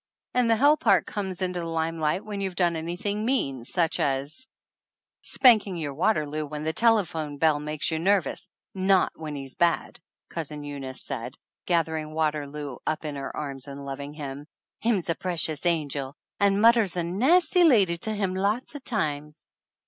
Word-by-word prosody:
"And 250 -2 +2
the 225 - +5
hell 290 +6 +5
part 200 -9 +3
comes 190 -3 -3
into 180 -1 -2
the 170 - -4
limelight 165 +2 -1
when 205 -2 -4
you've 190 -2 -3
done 175 -2 +2
anything 180 +6 -3
mean, 140 - 0
such 165 +1 0
as 140 - -1 0.4
" - - -67
"Spanking 215 -7 +4
your 150 -4 -3
Waterloo 155 -3 0
when 150 +1 -5
the 160 +1 -1
tele 225 0 +4
phone 155 -3 -5
bell 155 0 +3
makes 150 +1 -3
you 160 - -1
nervous 195 +1 +1 0.2
not 190 0 +3
when 155 -2 -6
he's 135 -2 -7
bad," 170 -1 0 0.3
Cousin 150 -3 -5
Eunice 140 -2 -7
said, - - -5 0.3
gathering 160 -2 0
Waterloo 150 -3 -2
up 155 0 -1
in 150 -1 -4
her 135 0 -6
arms 140 -2 -5
and 140 0 -8
loving 140 +1 -6
him. 145 -1 -7 0.3
"Him's 220 -6 0
a 165 - +2
pre 180 0 -4
cious 160 +1 -1
angel, 145 -4 -1 0.2
and 200 -1 +3
mudder's 225 -5 +4
a 175 - +1
nasty 315 - +3
lady 200 - +5
to 220 +6 -4
him 195 -3 -1
lots 205 +9 -1
of 290 -3 -8
times." 150 - -2
165 Hz, 175 wpm, -26 LUFS, 150-200 Hz, 0.4 s, the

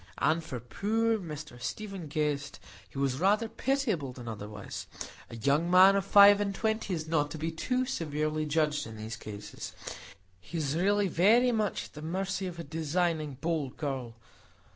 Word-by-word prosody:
As 160 +2 +2
for 130 -6 -5
poor 220 - 0
Mr 150 -7 -8
Stephen 195 - -5
Guest, 145 -2 -2 0.3
he - - -11
was 135 -1 0
rather 205 +5 +3
pitiable 220 - -1
than 125 -2 -10
otherwise; 105 -2 -6 0.4
a - - -8
young 140 +8 +1
man 185 +2 +8
of 200 - +2
five 200 +1 +8
and 200 -1 -1
twenty 220 -2 -1
is 160 -1 -5
not 155 -2 +1
to 155 - -6
be 160 +2 -2
too 250 +10 0
severely 155 - -1
judged 150 -1 +1
in 110 -1 -9
these 110 +1 -5
cases,—he 100 - -9
is 150 -2 -1
really 200 +3 +2
very 225 +9 +4
much 215 -4 -1
at - - -15
the 150 - -9
mercy 190 +4 -2
of 175 -2 -7
a 170 - -5
designing, 160 -1 -1
bold 160 -6 -1
girl. 130 -6 -3
160 Hz, 165 wpm, -30 LUFS, 140-195 Hz, 0.4 s, man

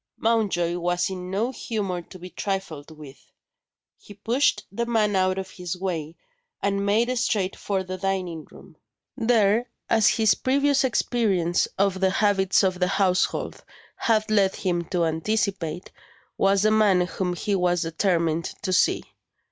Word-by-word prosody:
Mountjoy 195 -7 0
was 175 +1 0
in 180 -1 -6
no 215 +7 -1
humour 200 -8 -3
to 185 - -13
be 180 0 -10
trifled 190 -7 -4
with. 150 -4 -13 0.8
He 205 - -14
pushed 235 +8 +1
the 235 +4 -3
man 215 -3 +1
out 185 0 +2
of 190 -1 -5
his 180 -1 -5
way, 170 -4 -4 0.4
and 200 0 -1
made 225 +5 +1
straight 205 -6 0
for 195 -2 -2
the 185 0 -6
dining 180 -4 -2
room. - - -16 0.4
There, 230 -1 +2 0.2
as 220 -2 +4
his 220 -2 +3
previous 280 +1 +1
experience 205 -9 +1
of 195 -1 +1
the 190 0 +3
habits 195 -1 +2
of 185 -1 0
the 180 - +2
household 190 -1 0 0.3
had 215 -2 +1
led 195 -3 +3
him 175 -2 -1
to 175 -1 0
anticipate, 180 0 -2 0.4
was 195 0 +2
the 215 - +4
man 210 -4 +4
whom 180 0 -2
he 205 +3 -2
was 180 -2 +1
determined 165 -1 0 0.2
to 185 - -1
see. 180 - +2
190 Hz, 150 wpm, -24 LUFS, 180-215 Hz, 0.8 s, as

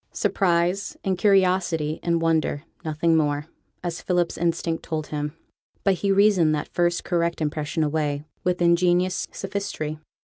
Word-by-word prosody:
Surprise, 180 +1 +1
and 190 -1 +1
curiosity, 180 -6 +2
and 170 -1 0
wonder; 160 -3 +1 0.2
nothing 160 +1 +1
more, 145 -2 +1 0.4
as 170 -1 -3
Philip's 175 -2 0
instinct 165 -1 -1
told 155 -1 -3
him. 150 0 -3 0.5
But 195 - +4
he 195 +2 0
reasoned 195 -6 +4
that 150 - -5
first 175 0 +1
correct 170 -1 0
impression 155 0 -1
away 150 -1 -1 0.2
with 180 -1 +1
ingenious 175 +1 +2
sophistry. 195 -6 -4
170 Hz, 135 wpm, -24 LUFS, 155-180 Hz, 0.5 s, But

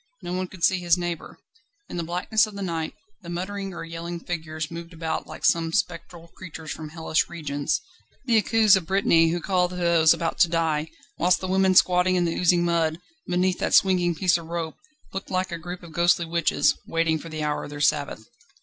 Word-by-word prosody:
No 175 - -4
one 185 0 -2
could 180 -2 -12
see 185 -1 +4
his 175 0 +3
neighbour. 175 -2 -5 0.5
In - - -7
the 170 - -1
blackness 180 +6 +1
of 210 - -11
the 200 - -4
night 165 -3 -3 0.3
the 170 - -10
muttering 195 +3 -4
or 175 - -7
yelling 170 +1 -6
figures 160 -2 -5
moved 170 +1 -8
about 160 -1 -3
like - - -6
some 165 -1 +2
spectral 175 -3 -3
creatures 160 -3 -9
from 155 -1 -6
hellish 160 0 -1
regions 145 -4 -2 0.5
the 230 -4 +4
Akous 220 -1 +5
of 180 -4 -2
Brittany 180 -4 +4
who 175 +2 -1
call 180 +1 +1
to 180 - -8
those 170 -2 +4
about 165 - 0
to 175 - +5
die; 160 -2 0 0.3
whilst 180 +2 +3
the 185 - -4
women 190 0 +3
squatting 180 0 +4
in 175 -1 +2
the 165 - 0
oozing 175 0 +3
mud, 165 -2 +1 0.3
beneath 180 +1 +1
that - - +1
swinging 180 -3 +3
piece 175 +1 +2
of 165 - -11
rope, 165 -1 -4 0.4
looked 195 0 -5
like 185 0 -1
a 170 - -4
group 175 +2 -8
of 170 - -11
ghostly 170 +1 +3
witches, 170 0 +2
waiting 165 -1 +1
for 165 - -9
the 155 -1 -4
hour 150 0 -1
of - - -9
their 145 0 -8
Sabbath. 145 -6 0
170 Hz, 210 wpm, -25 LUFS, 165-185 Hz, 0.5 s, Akous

